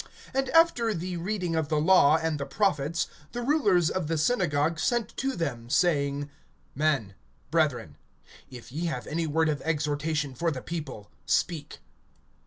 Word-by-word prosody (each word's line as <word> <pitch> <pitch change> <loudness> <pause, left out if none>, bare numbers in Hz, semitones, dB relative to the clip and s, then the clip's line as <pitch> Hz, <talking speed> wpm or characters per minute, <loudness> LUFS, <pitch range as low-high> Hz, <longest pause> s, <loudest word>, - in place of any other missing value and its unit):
(15)And 270 0 0
after 285 -10 +4
the 180 +2 -4
reading 180 -1 -2
of 160 -2 0
the 155 - +2
law 160 -2 +5
and 160 -2 -2
the 140 - -2
prophets, 170 -2 0 0.3
the 240 - -3
rulers 210 - +3
of 185 -5 -2
the 165 0 0
synagogue 155 -5 +1
sent 235 +6 0
to 270 0 -1
them, 120 -8 -4
saying: 145 -3 +1 0.5
Men, 140 -9 0 0.4
brethren, 125 - 0 0.5
if 125 -2 -11
ye 160 +6 -3
have 125 -7 -3
any 165 +1 -2
word 160 +2 +2
of 150 -2 -1
exhortation 150 -2 -1
for 165 +7 0
the 130 -5 -5
people, 145 -11 -6 0.2
speak. 160 -5 -1
160 Hz, 155 wpm, -27 LUFS, 145-180 Hz, 0.5 s, law